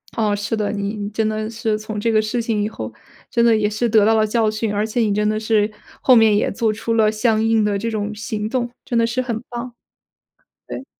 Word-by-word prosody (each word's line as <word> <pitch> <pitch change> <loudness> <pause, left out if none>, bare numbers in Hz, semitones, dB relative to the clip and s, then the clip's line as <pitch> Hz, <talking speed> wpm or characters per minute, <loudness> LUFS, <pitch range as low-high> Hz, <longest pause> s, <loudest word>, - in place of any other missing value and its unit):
哦， 215 -2 +1
是 205 +2 -2
的， 210 -2 -1
你 205 0 -3
真 215 +1 -1
的 215 0 -2
是 220 -1 -1
从 215 0 -5
这 230 +2 +1
个 215 -1 +4
事 215 +3 -2
情 225 -2 -1
以 210 - -1
后， - - -7 0.4
真 235 - +2
的 230 -1 +5
也 210 -1 +1
是 220 +3 -1
得 215 -2 +5
到 220 - +4
了 220 -1 +3
教 220 0 +2
训， 215 0 -2
而 205 +1 0
且 220 +2 -2
你 220 -3 +2
真 210 +1 +1
的 215 0 0
是 215 -1 +1 0.3
后 255 - +6
面 220 -2 +5
也 205 - +1
做 220 +2 0
出 225 +2 -3
了 220 -2 +3
相 220 0 +1
应 225 -1 +3
的 205 -1 +1
这 230 +3 -2
种 215 -1 -3
行 215 0 -4
动， 240 +1 -1 0.2
真 240 - -1
的 230 - +3
是 240 +2 -1
很 230 -3 -3
棒。 240 0 -6 0.9
对。 265 - -7
220 Hz, 260 characters per minute, -20 LUFS, 210-230 Hz, 0.9 s, 后